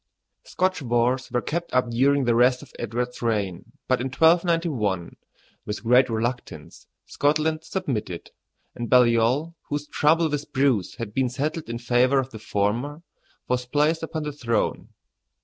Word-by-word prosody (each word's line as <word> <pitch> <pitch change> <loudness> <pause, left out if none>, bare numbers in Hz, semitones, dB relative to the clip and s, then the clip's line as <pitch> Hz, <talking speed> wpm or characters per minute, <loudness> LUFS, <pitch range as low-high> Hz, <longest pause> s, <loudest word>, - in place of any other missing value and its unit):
Scotch 185 -2 -1
wars 125 +1 0
were 120 0 -1
kept 170 +2 -3
up 125 -2 +2
during 135 +4 +3
the 120 - +3
rest 125 +3 +3
of 135 - -16
Edward's 120 +2 -3
reign; 105 -2 -2
but 130 -1 +1
in 130 - -1
1291, 160 - +1 0.5
with 105 +2 -5
great 125 +2 +4
reluctance, 120 +2 -4 0.2
Scotland 155 +2 0
submitted, 115 - -4 0.4
and 120 -1 -5
Baliol, 125 +5 +3 0.2
whose 145 0 -2
trouble 160 +3 +2
with 150 -1 -4
Bruce 130 -8 +1
had 115 -4 -6
been 130 0 +1
settled 150 +3 -3
in 115 - -3
favor 125 +3 +2
of 135 0 -1
the 110 - -9
former, 115 +10 -2 0.4
was 125 0 -1
placed 150 +4 +1
upon 160 -1 -4
the 150 - -3
throne. 115 -6 -1
125 Hz, 150 wpm, -24 LUFS, 115-150 Hz, 0.5 s, great